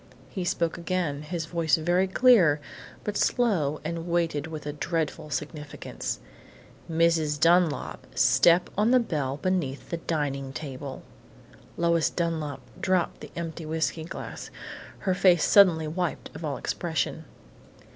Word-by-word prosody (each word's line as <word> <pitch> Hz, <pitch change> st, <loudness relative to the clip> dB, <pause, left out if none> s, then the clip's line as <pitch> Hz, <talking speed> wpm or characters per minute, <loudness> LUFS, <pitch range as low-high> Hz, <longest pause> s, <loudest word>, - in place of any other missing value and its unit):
He 185 Hz, -, -3 dB
spoke 170 Hz, -2 st, -1 dB
again, 170 Hz, -5 st, -1 dB
his 165 Hz, +1 st, -4 dB
voice 165 Hz, -4 st, +2 dB
very 175 Hz, +4 st, +2 dB
clear, 190 Hz, -, +5 dB, 0.4 s
but 210 Hz, -, -3 dB
slow 175 Hz, -, +1 dB
and 165 Hz, +1 st, -4 dB
weighted 165 Hz, -4 st, 0 dB
with 155 Hz, -2 st, -7 dB
a 150 Hz, -, -3 dB
dreadful 155 Hz, 0 st, -2 dB
significance: 150 Hz, 0 st, -5 dB, 0.7 s
"Mrs. 160 Hz, -2 st, +2 dB
Dunlap, 170 Hz, -1 st, +2 dB
step 130 Hz, +9 st, +4 dB
on 210 Hz, +3 st, +3 dB
the 255 Hz, +1 st, +6 dB
bell 145 Hz, -, -2 dB
beneath 170 Hz, -7 st, -2 dB
the 170 Hz, -, -1 dB
dining 140 Hz, -5 st, -2 dB
table!" 135 Hz, -2 st, -6 dB, 0.7 s
Lois 170 Hz, -1 st, +2 dB
Dunlap 160 Hz, -5 st, -2 dB, 0.2 s
dropped 185 Hz, -2 st, 0 dB
the -, -, -8 dB
empty 165 Hz, -1 st, -5 dB
whiskey 160 Hz, +1 st, -1 dB
glass, 165 Hz, -, -7 dB, 0.5 s
her 190 Hz, -, +1 dB
face 180 Hz, -3 st, +4 dB
suddenly 175 Hz, -6 st, +6 dB
wiped 175 Hz, +2 st, -3 dB
of -, -, -8 dB
all 145 Hz, -3 st, -2 dB
expression. 160 Hz, -1 st, -2 dB
165 Hz, 130 wpm, -27 LUFS, 150-175 Hz, 0.7 s, the